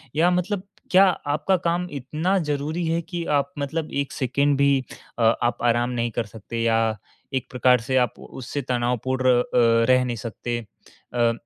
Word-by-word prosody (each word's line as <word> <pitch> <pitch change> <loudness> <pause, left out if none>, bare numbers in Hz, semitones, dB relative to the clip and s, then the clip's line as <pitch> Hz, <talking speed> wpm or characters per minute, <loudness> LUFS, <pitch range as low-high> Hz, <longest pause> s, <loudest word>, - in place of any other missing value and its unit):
या 170 +4 +4
मतलब 185 +2 -1 0.3
क्या 190 +1 +7
आपका 155 0 +1
काम 175 +1 +1
इतना 155 +8 -1
ज़रूरी 150 +4 -2
है 165 +1 0
कि, 170 0 -5
आप 145 0 +1
मतलब 155 +3 -3
एक 140 -1 -2
सेकंड 140 +2 +1
भी 140 -1 +3 0.4
अ, - - 0 0.2
आप 120 - +1
आराम 120 0 +2
नहीं 120 -1 -1
कर 115 +1 -2
सकते 110 +2 -6
या 115 -1 +2 0.4
एक 130 - -2
प्रकार 125 -1 +3
से 130 +2 0
आप 125 -3 +1
उससे 130 +3 -6
तनावपूर्ण 125 +1 0
अ, - - +2 0.4
रह 130 0 +5
नहीं 120 -2 -3
सकते। 120 +2 -4 0.5
अ, 120 -1 +3
130 Hz, 170 wpm, -24 LUFS, 120-155 Hz, 0.5 s, क्या